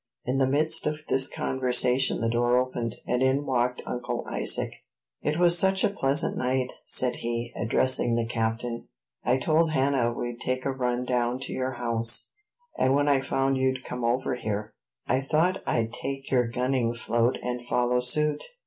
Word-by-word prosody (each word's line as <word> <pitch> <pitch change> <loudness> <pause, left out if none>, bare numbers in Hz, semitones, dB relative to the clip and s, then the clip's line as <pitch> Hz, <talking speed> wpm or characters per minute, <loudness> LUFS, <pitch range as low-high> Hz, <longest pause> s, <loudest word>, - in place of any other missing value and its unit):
In 130 +2 0
the 135 - +3
midst 150 +3 +2
of 150 +1 -2
this 135 0 +3
conversation 130 0 +1
the 115 - +1
door 120 +1 +2
opened, 125 -3 -1
and 125 0 0
in 135 +2 +2
walked 125 -1 0
Uncle 120 0 -4
Isaac. - - -1 0.5
"It 150 +1 -1
was 175 0 +5
such 190 +1 +2
a - - +3
pleasant 140 -4 +1
night," 130 0 -1
said 125 -1 +2
he, 120 0 -3
addressing 120 0 +1
the 115 -1 0
captain, 115 +1 -2 0.4
"I 125 +2 +2
told 155 +4 +2
Hannah 135 -4 +2
we'd 120 0 -5
take 130 0 -2
a 135 - +1
run 125 -1 -1
down 125 0 0
to - - -4
your 130 0 -2
house; 115 -1 0 0.5
and 130 +1 +3
when 145 +1 +2
I 140 -2 +3
found 135 0 0
you'd 130 0 0
come 125 -1 -5
over 125 +3 0
here, 105 -4 -4 0.3
I 130 - +1
thought 160 +7 +1
I'd 115 0 0
take 135 +1 -5
your 125 -3 +3
gunning 125 -1 0
float 120 +1 +1
and 125 0 -3
follow 125 0 +1
suit." 150 +4 0
125 Hz, 175 wpm, -27 LUFS, 120-135 Hz, 0.5 s, was